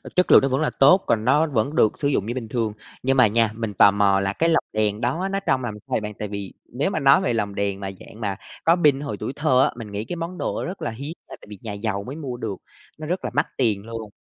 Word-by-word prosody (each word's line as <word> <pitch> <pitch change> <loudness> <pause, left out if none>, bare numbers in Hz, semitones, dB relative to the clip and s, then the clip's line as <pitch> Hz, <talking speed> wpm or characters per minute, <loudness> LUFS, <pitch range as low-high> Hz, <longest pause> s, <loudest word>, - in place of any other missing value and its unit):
chất 180 - +3
lượng - - +10
nó 135 - +1
vẫn 135 +2 0
là 155 - +2
tốt, 145 +8 +6
còn 110 -1 +1
nó 150 +6 +4
vẫn 140 +1 -1
được 110 - +3
sử 140 - 0
dụng 135 -8 0
như 115 - -3
bình 125 -3 -5
thường, 110 -3 -1 0.3
nhưng 135 +1 +2
mà 125 -3 +7
nha, 115 +1 +2
mình 110 -3 -4
tò 100 - +6
mò 100 -1 +3
là 95 0 -1
cái 165 +9 +1
lồng 165 - +3
đèn 105 0 0
đó 150 +11 -1
nó 195 - 0
trông 135 -9 0
làm 115 -3 -3
sao 105 - -14
vậy - - +1
bạn? 105 0 -5
Tại 105 - -3
vì 100 -1 -6 0.2
nếu 140 +9 0
mà 195 - -2
nói 140 +5 +5
về 120 - 0
lồng 100 -3 -2
đèn 100 -1 -1
mà 95 -1 -4
dạng 110 - -13
mà 100 -3 -1 0.3
có 165 - +6
pin 140 -2 +5
hồi 145 -1 -5
tuổi - - -4
thơ 135 -4 +3
á, - - +2
mình 105 -3 -8
nghĩ 105 +2 -4
cái 175 - -5
món 170 +2 -5
đồ - - -2
rất 185 +3 -6
là 115 - -2
hiếm 140 +8 -6
là - - -9
tại - - -15
vì 100 -3 -10
nhà 105 -3 -5
giàu 100 -1 -3
mới 135 - -6
mua 135 -6 -5
được, 100 -5 -4 0.4
nó 155 - -7
rất 180 +3 -2
là - - -3
mắc - - +1
tiền 110 -5 +1
luôn, 115 -2 -7
115 Hz, 300 wpm, -23 LUFS, 105-145 Hz, 0.4 s, lượng